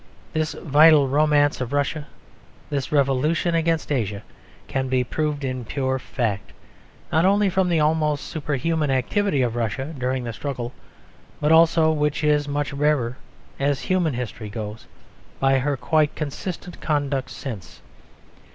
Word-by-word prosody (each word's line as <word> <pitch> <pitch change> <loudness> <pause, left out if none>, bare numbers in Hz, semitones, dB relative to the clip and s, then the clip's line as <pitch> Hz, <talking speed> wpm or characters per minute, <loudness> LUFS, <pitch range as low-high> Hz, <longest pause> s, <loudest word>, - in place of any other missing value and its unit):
This 155 -1 -1
vital 150 -1 +5
romance 145 0 +3
of 125 +2 -3
Russia, 145 +1 -1 0.6
this 140 -2 -2
revolution 150 +4 +2
against 165 -2 0
Asia, 105 -7 -1 0.4
can 130 -1 -1
be 130 -1 +2
proved 150 +2 -2
in 130 -2 -3
pure 130 +3 -1
fact: 115 -6 -3 0.6
not 160 - +3
only 200 +1 +3
from 185 0 +2
the 170 -2 +2
almost 150 -1 +1
superhuman 150 0 -1
activity 135 - +1
of 120 -2 -1
Russia 120 +6 -2
during 130 -1 -2
the 115 -1 -4
struggle, 125 -1 -5 0.7
but 150 +1 +2
also 160 0 +5
(which 150 -1 0
is 150 -1 +2
much 145 0 -2
rarer 140 -4 +1 0.4
as 140 0 +1
human 175 -7 0
history 115 -3 -5
goes) 105 0 -7 0.5
by 135 0 +3
her 140 +1 -1
quite 155 +4 +1
consistent 170 +4 -6
conduct 140 -3 -1
since. 100 -10 -8
145 Hz, 140 wpm, -23 LUFS, 130-155 Hz, 0.7 s, vital